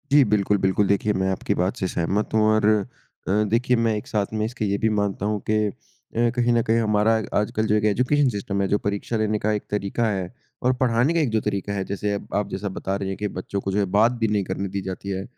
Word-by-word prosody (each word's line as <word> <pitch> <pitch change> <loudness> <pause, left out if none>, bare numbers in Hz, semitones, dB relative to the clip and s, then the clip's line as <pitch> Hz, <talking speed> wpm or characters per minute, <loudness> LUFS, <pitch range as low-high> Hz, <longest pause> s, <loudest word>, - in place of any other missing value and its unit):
जी, 145 0 +7
बिल्कुल, 105 -1 +2
बिल्कुल। 95 +1 +2
देखिए, 100 +1 +2
मैं 95 -1 0
आपकी 95 - -1
बात 90 +2 0
से 95 - -1
सहमत 95 +6 -1
हूँ 110 - +4
और 110 -1 +2 0.6
अ, - - 0 0.2
देखिए 125 +3 +2
मैं 115 -1 +1
एक 105 +5 -5
साथ 105 -7 0
में 110 0 0
इसके 115 0 -3
ये 100 0 0
भी 110 - +4
मानता 100 -2 -1
हूँ 105 0 0
कि - - +3
अ, - - -3 0.7
कहीं 120 0 +3
न 120 - +3
कहीं 115 +1 +4
हमारा 105 0 +2 0.3
आजकल 105 +1 -1
जो 105 - +3
एक 105 0 +1
एजुकेशन 125 +7 +2
सिस्टम 100 -2 -2
है, 95 - +1
जो 105 - +2
परीक्षा 100 +3 -1
लेने 110 -1 0
का 110 - 0
एक 105 - -2
तरीका 105 +3 -1
है 95 -1 -3 0.3
और 125 +1 +3
पढ़ाने 125 +4 +3
का 170 - +2
एक 150 -6 +1
जो - - 0
तरीका 100 -1 -2
है, 100 -1 -1
जैसे 100 +1 -2
अब 100 - -5
आप 105 - -7
जैसा 100 +2 -3
बता 95 - -2
रहे 100 -1 -3
हैं 95 - -4
कि 105 - -2
बच्चों 100 +2 -3
को 95 - -3
जो 100 - 0
है 100 - +2
बात 115 +3 +5
भी - - +4
नहीं 105 -2 +1
करने 100 - -2
दी 100 - 0
जाती 95 +1 -6
है। 95 0 -2
105 Hz, 260 wpm, -23 LUFS, 100-110 Hz, 0.7 s, जी